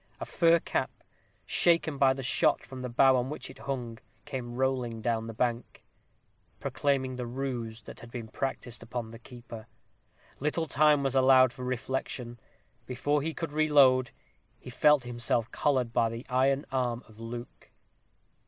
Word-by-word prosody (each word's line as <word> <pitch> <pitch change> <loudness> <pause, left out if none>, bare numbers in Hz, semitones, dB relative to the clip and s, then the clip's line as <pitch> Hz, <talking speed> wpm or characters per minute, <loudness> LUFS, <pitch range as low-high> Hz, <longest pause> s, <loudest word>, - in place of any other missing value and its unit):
A - - -4
fur 170 -1 +4
cap, - - -1 0.6
shaken 165 -4 +2
by 135 -1 +5
the 135 0 -6
shot 150 +4 +2
from 130 -1 -9
the 125 - -4
bough 130 +2 +5
on 125 +1 0
which 135 -3 -6
it - - -16
hung, 120 -5 -5 0.3
came 120 -2 -5
rolling 125 -3 -1
down 115 0 -1
the - - -5
bank, 120 0 -2 0.8
proclaiming 130 -3 -1
the 125 -1 -4
ruse 120 -3 -4
that - - -11
had 120 - -11
been 120 -2 -7
practised 125 0 -4
upon 115 -1 -5
the 115 - -11
keeper. 120 -2 -11 0.7
Little 150 +3 -1
time 150 -1 +3
was 135 -1 0
allowed 130 -1 +6
him - - -17
for 125 - -5
reflection. 125 -1 -4 0.5
Before 145 +3 0
he 160 +2 -3
could 165 -3 -4
reload, 140 -5 +4 0.5
he - - -11
felt 150 -3 +4
himself 120 -1 -1
collared 130 -5 0
by 115 - +2
the 115 +2 -7
iron 135 +2 +2
arm 125 -2 -1
of 110 0 -18
Luke. 120 +1 -8
130 Hz, 160 wpm, -29 LUFS, 120-135 Hz, 0.8 s, allowed